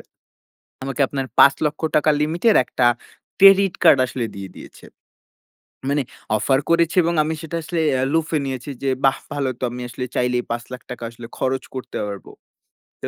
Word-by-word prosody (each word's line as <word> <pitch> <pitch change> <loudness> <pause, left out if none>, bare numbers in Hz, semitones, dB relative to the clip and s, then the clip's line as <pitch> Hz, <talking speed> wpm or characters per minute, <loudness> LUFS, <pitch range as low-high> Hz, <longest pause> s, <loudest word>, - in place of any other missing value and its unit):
আ - - -14 0.8
আমাকে 135 0 -3
আপনার 135 -2 -4
৳৫,০০,০০০ 150 +2 +3
limit 160 +3 -2
এর - - +5
একটা 125 - 0 0.5
credit 195 -1 +7
card - - +7
আসলে 125 -1 -3
দিয়ে 95 -1 -7
দিয়েছে। - - -13 1.0
মানে 145 0 +1 0.4
offer 135 +4 +2
করেছে 170 0 +2
এবং 170 +1 0
আমি 160 +1 -2
সেটা 165 +1 -5
আসলে 165 +1 -3 0.2
অ্যা 130 - +1
লুফে 160 -1 +1
নিয়েছি 130 +1 -5
যে 135 - +1 0.2
বাহ! 135 - +3 0.2
ভালো 140 -2 -1
তো - - -7
আমি 125 0 -7
আসলে 125 +1 -5
চাইলেই 125 0 +1
৳৫,০০,০০০ 125 +1 -6
আসলে 115 0 -11
খরচ 130 0 -1
করতে 130 - -6
পারবো। 100 -1 -8 0.7
তো - - -4
135 Hz, 160 wpm, -21 LUFS, 125-160 Hz, 1.0 s, credit